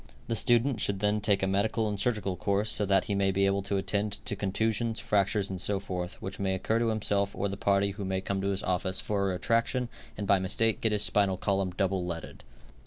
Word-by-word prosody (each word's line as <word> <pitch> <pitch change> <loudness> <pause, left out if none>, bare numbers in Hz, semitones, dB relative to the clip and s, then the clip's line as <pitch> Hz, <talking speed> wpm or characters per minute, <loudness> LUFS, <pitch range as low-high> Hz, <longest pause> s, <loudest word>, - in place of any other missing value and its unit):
The 115 - -1
student 120 +2 +2
should 100 -1 0
then 105 +1 +1
take 100 -2 +2
a - - +2
medical 110 +3 +1
and 105 -1 -3
surgical 105 -6 0
course, 100 +3 +1
so 105 - +5
that 95 0 +3
he 100 - -2
may 100 -1 +2
be 100 +1 +2
able 100 0 +1
to 100 0 -2
attend 100 +1 -1
to - - -1
contusions, 110 +3 -1
fractures 105 -2 +1
and 95 -2 -4
so 100 -1 0
forth, 90 -2 -5
which 95 0 -6
may 95 -1 0
occur 110 +4 0
to 115 - +1
himself 100 -2 0
or - - -2
to 100 - -1
the - - -3
party 100 0 +2
who 100 +1 -6
may 95 0 -1
come 95 0 -3
to 100 - -1
his 95 -1 -1
office 95 +1 0
for 100 -2 -1
a - - -1
retraction 115 +5 0 0.3
and 105 - -3
by 100 -1 +4
mistake 105 +4 +1
get 110 - +2
his 105 -1 +2
spinal 100 -3 +2
column 95 0 0
double 95 0 -1
leaded. 85 -2 -6
100 Hz, 240 wpm, -29 LUFS, 95-105 Hz, 0.3 s, so